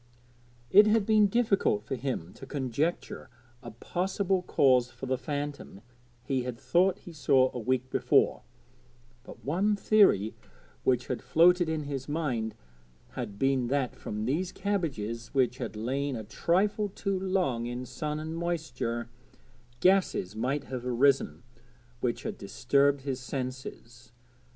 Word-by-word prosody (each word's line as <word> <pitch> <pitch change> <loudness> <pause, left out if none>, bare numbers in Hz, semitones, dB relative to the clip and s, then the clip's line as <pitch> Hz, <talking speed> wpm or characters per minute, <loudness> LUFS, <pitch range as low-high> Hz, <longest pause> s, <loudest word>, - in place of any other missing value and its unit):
It 205 +2 +8
had 215 -1 +3
been 215 -1 +5
difficult 200 - +1
for 115 - -5
him 125 -9 -3
to 135 - -11
conjecture 140 +4 -2 0.3
a - - -8
possible 185 - -1
cause 130 -7 +3
for - - -8
the 130 0 0
phantom 145 -5 -5 0.4
he 135 -2 -1
had 125 -1 -5
thought 180 +6 +2
he 175 - -12
saw 135 -4 +3
a 125 - -4
week 130 +2 0
before, - - +2 0.8
but - - -13
one 190 +9 +1
theory 200 - +4 0.5
which 125 -1 +2
had - - -3
floated 170 +6 +4
in 160 -1 -1
his 140 -1 -5
mind 130 -8 -2 0.5
had 100 - -6
been 135 0 +1
that 135 -1 -1
from 105 0 -5
these 165 +9 -1
cabbages, 140 - -3
which 125 -2 +2
had - - -5
lain 135 +5 -2
a 110 - -5
trifle 200 - 0
too 195 0 -2
long 180 -12 0
in 120 +1 -5
sun 150 +4 -4
and 160 +1 -5
moisture; 155 -9 -3 0.7
gases 185 - +2
might 135 +6 -1
have 130 -2 -6
arisen 125 - +2 0.6
which 120 -2 -2
had - - -5
disturbed 140 +7 +2
his 135 -1 -3
senses. 125 -2 -7
135 Hz, 140 wpm, -29 LUFS, 125-175 Hz, 0.8 s, It